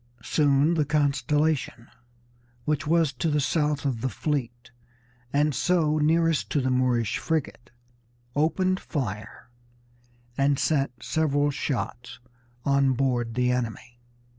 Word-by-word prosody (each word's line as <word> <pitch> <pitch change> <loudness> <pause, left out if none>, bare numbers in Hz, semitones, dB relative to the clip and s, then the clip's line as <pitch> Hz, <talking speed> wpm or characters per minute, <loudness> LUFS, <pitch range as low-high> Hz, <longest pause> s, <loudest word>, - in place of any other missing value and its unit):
Soon 145 +1 +3
the 160 -3 +2
Constellation, 150 -3 0 0.8
which 150 -1 -1
was 165 -3 +2
to 145 +6 -1
the 150 0 +1
south 150 +1 0
of 125 -5 -1
the 130 - 0
fleet 120 -3 -3 0.6
and 145 +1 +2
so 155 -2 +1
nearest 165 +1 +2
to 145 - +1
the 130 -1 0
Moorish 125 -3 +1
frigate, 155 -6 -3 0.7
opened 185 +5 +1
fire 110 - -5 0.8
and 140 +1 +2
sent 135 -4 0
several 145 +2 +1
shots 120 -4 -4 0.5
on 140 -1 +3
board 120 -3 -1
the 125 0 +2
enemy. 120 0 -4
140 Hz, 115 wpm, -26 LUFS, 125-150 Hz, 0.8 s, Soon